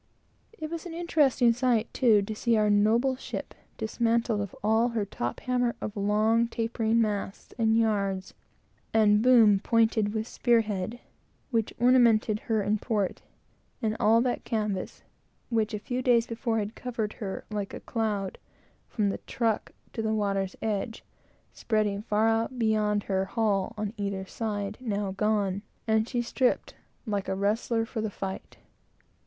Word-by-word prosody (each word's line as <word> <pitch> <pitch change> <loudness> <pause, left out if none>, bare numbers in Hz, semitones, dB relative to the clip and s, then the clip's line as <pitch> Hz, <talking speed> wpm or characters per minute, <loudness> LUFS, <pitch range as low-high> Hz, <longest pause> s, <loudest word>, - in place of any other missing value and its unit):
It 310 0 -6
was 335 +1 -5
an 330 - -7
interesting 290 -8 +3
sight, 240 -2 +1
too, 220 -6 +4
to 215 - -4
see 230 +1 +1
our 210 -1 +3
noble 225 +6 +3
ship, - - -6 0.2
dismantled 230 -1 0
of 200 - -6
all 220 +3 +3
her 225 -3 -1
top 120 -10 -4
hamper 245 -1 0
of 210 - -5
long 215 +3 +2
tapering 230 0 0
masts 205 -3 -2
and 225 0 +3
yards, 200 -4 0 0.6
and 210 -1 +5
boom 225 -5 +6
pointed 220 -1 +2
with 220 +1 -2
spear 235 -2 +3
head, 210 +2 -4 0.5
which 225 -3 0
ornamented 235 -3 +4
her 220 -2 0
in 210 +1 +1
port; 210 -5 -1 0.6
and 220 -3 -1
all 225 +2 +5
that 245 0 -1
canvas, 210 -4 -3 0.5
which 225 -3 +1
a 210 - -2
few 245 +5 -3
days 240 -2 +4
before 230 0 -2
had 210 0 -2
covered 230 -4 -4
her 195 -2 -4
like 205 -2 -3
a - - -6
cloud, 210 -5 -2 0.5
from 205 -2 0
the - - -3
truck 225 -3 -1 0.2
to 225 - -3
the 220 0 0
water's 195 -2 -1
edge, 220 +1 -2 0.5
spreading 210 -2 0
far 215 0 +1
out 225 +3 0
beyond 215 -2 +1
her 190 -1 0
hull 210 0 0
on 210 0 -3
either 200 -2 -3
side, 205 -1 -4
now 205 -5 -2
gone; 200 -1 0 0.2
and 220 0 +1
she, 240 -2 -1
stripped, 250 +1 0 0.3
like 205 -3 -2
a 190 - -1
wrestler 225 +3 0
for 225 0 -4
the 220 - -1
fight. 195 -1 -6
220 Hz, 155 wpm, -28 LUFS, 205-230 Hz, 0.6 s, boom